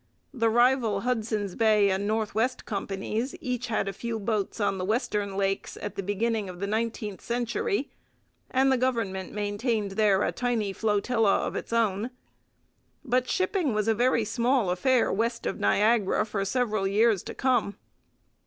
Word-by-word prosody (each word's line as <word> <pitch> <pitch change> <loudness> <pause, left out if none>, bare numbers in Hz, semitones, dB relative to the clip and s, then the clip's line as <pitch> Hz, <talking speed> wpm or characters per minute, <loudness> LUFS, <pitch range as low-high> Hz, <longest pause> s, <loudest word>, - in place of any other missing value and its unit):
The 230 -4 +2
rival 240 -3 +3
Hudson's 220 -5 -1
Bay 210 -2 +3
and 195 +2 -1
North 215 0 -1
West 250 +4 0
Companies 210 - -3
each 250 -5 -3
had 215 -3 -1
a 195 - -2
few 230 +3 -4
boats 215 0 -2
on 195 -2 0
the - - -2
western 205 -2 -1
Lakes 195 0 -1
at 205 - -5
the - - -3
beginning 205 +1 -1
of 180 -1 -9
the 200 - -2
nineteenth 215 -1 -3
century, 280 - -2 0.6
and 265 +1 +3
the 260 - +2
government 225 -7 -1
maintained 210 0 -1
there 205 -1 +3
a - - +1
tiny 230 -5 -1
flotilla 215 0 +1
of - - -4
its - - -5
own. 225 -1 +1 1.0
But 255 0 +1
shipping 370 - 0
was 215 0 0
a 225 - +4
very 235 0 +2
small 235 -3 +1
affair 245 +7 +2
west 230 +3 -1
of - - -2
Niagara 210 0 +2
for 210 -2 -2
several 215 -3 0
years 210 0 +3
to - - -8
come. 250 -6 +1
220 Hz, 160 wpm, -27 LUFS, 200-245 Hz, 1.0 s, a